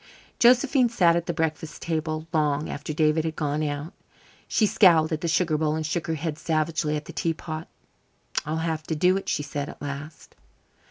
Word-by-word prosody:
Josephine 250 Hz, +1 st, +5 dB
sat 175 Hz, -7 st, +4 dB
at 170 Hz, 0 st, -1 dB
the -, -, +1 dB
breakfast 160 Hz, -1 st, -3 dB
table 155 Hz, -1 st, -2 dB
long 150 Hz, -1 st, +1 dB
after 145 Hz, +1 st, -5 dB
David 155 Hz, +1 st, +2 dB
had 160 Hz, -1 st, -3 dB
gone 150 Hz, 0 st, -1 dB
out. 145 Hz, +2 st, -3 dB, 0.5 s
She 220 Hz, -, +2 dB
scowled 170 Hz, -6 st, +5 dB
at 160 Hz, 0 st, -2 dB
the 170 Hz, -, -1 dB
sugar 160 Hz, -2 st, +1 dB
bowl 155 Hz, -1 st, +1 dB
and 160 Hz, 0 st, -2 dB
shook 165 Hz, +2 st, -2 dB
her 165 Hz, -, 0 dB
head 155 Hz, 0 st, -4 dB
savagely 155 Hz, -1 st, 0 dB
at 150 Hz, 0 st, -4 dB
the -, -, -9 dB
tea 165 Hz, -1 st, -1 dB
pot. 155 Hz, 0 st, -6 dB, 0.8 s
"I'll 155 Hz, +2 st, -2 dB
have 160 Hz, -2 st, -1 dB
to 160 Hz, -, -1 dB
do 180 Hz, +4 st, +3 dB
it," 195 Hz, -, -3 dB
she 150 Hz, -, 0 dB
said 145 Hz, +1 st, -4 dB
at -, -, -11 dB
last. 145 Hz, +2 st, -7 dB
155 Hz, 200 wpm, -25 LUFS, 150-170 Hz, 0.8 s, Josephine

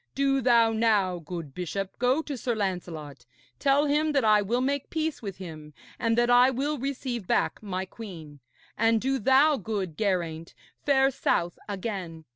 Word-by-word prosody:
Do 275 Hz, 0 st, +2 dB
thou 235 Hz, -2 st, +4 dB
now, 210 Hz, -5 st, +2 dB
good 165 Hz, -3 st, -7 dB
bishop, 185 Hz, +3 st, -5 dB
go 255 Hz, +6 st, +2 dB
to 290 Hz, -, -5 dB
Sir 240 Hz, -1 st, -2 dB
Lancelot, 170 Hz, -, -4 dB, 0.4 s
tell 280 Hz, +1 st, +3 dB
him 300 Hz, +1 st, +1 dB
that 275 Hz, -5 st, +2 dB
I 210 Hz, -1 st, +5 dB
will 230 Hz, +5 st, 0 dB
make 275 Hz, +2 st, -1 dB
peace 320 Hz, -1 st, -2 dB
with 200 Hz, -5 st, -6 dB
him 155 Hz, -5 st, -9 dB, 0.2 s
and 230 Hz, -1 st, +1 dB
that 240 Hz, 0 st, +3 dB
I 245 Hz, +1 st, +7 dB
will 280 Hz, +3 st, -2 dB
receive 255 Hz, -5 st, -4 dB
back -, -, 0 dB
my 190 Hz, -3 st, -3 dB
queen. 170 Hz, -9 st, -10 dB, 0.4 s
And 225 Hz, 0 st, +3 dB
do 265 Hz, +3 st, 0 dB
thou, 270 Hz, +6 st, +4 dB
good 195 Hz, -6 st, -4 dB
Geraint, 170 Hz, -6 st, -2 dB, 0.3 s
fare 270 Hz, -1 st, +4 dB
south 175 Hz, -8 st, -1 dB
again. 190 Hz, -6 st, -5 dB
220 Hz, 165 wpm, -27 LUFS, 180-265 Hz, 0.4 s, I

